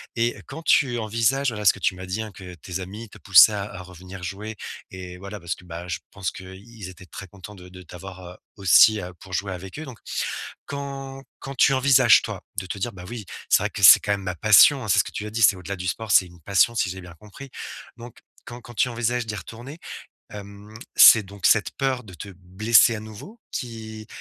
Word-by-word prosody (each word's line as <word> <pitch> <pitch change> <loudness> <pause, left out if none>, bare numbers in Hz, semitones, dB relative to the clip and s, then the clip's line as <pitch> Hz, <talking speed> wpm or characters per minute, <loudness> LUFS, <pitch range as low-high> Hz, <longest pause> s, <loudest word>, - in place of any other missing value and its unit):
et 120 0 0
quand 155 +4 -8
tu 130 -6 +2
envisages, 115 +5 0
voilà 105 -3 -6
ce - - +6
que - - -12
tu 95 - 0
m'as 95 +1 -9
dit, 95 +4 -4
hein, 110 -1 -7
que 90 -1 -11
tes 90 +3 -7
amis 105 +5 -9
te - - -15
poussaient 100 +2 +7
à 100 -1 -3
à 90 - -8
revenir 90 +1 -12
jouer 100 +4 -6 0.4
et 90 -1 -9
voilà 100 +3 -9
parce 85 -1 -4
que, 90 - -18
bah, 85 0 -8
je 85 - -3
pense 95 -3 -4
qu'ils 95 +3 -11
étaient 90 0 -14
très 90 - -10
contents 100 +3 -13
de 90 -1 -14
de 90 0 -13
t'avoir, 90 +1 -11
heu, 90 +1 -11 0.2
aussi 100 +3 +5 0.2
pour 95 - -13
jouer 100 +1 -2
avec 95 +8 -9
eux, 155 - -7
donc 130 -5 -11 0.7
quand 135 -1 -7 0.2
quand 135 - -8
tu 135 - +4
envisages, 130 -3 +5
toi, - - -7
de 95 - -4
te 95 - -6
dire: 120 +5 -3
«Bah, 90 -3 -11
oui, 120 -1 -7 0.2
c'est - - +4
vrai - - -2
que 105 - -7
c'est 95 - +10
quand 105 - -2
même 100 -1 -2
ma 90 -2 -4
passion, 110 - +5
hein», - - -7
c'est 105 +2 +3
ce - - +4
que - - -8
tu 105 - -5
as - - -7
dit, 115 +2 -4
c'est 100 -1 +5
au-delà 90 +2 -6
du 90 0 -7
sport, 110 +3 -4
c'est 95 -2 +5
une 85 -1 -17
passion 100 +6 +2
si 95 -5 0
j'ai 95 +1 -7
bien 90 -2 -13
compris, 105 +9 -13 0.5
donc 120 -1 -12 0.3
quand 120 +1 -10
quand 120 0 -14
tu 125 - +1
envisages 120 0 -2
d'y 110 - -5
retourner, 120 - -10 0.5
hem, 100 +1 -11 0.2
c'est 115 - +8
donc 100 -1 -9
cette 110 - +3
peur 135 -2 -1
de 100 -4 -14
te 90 +4 -9
blesser 110 +6 +3
à - - -6
nouveau 110 - -12
qui 110 -3 -7
105 Hz, 235 wpm, -23 LUFS, 95-115 Hz, 0.7 s, c'est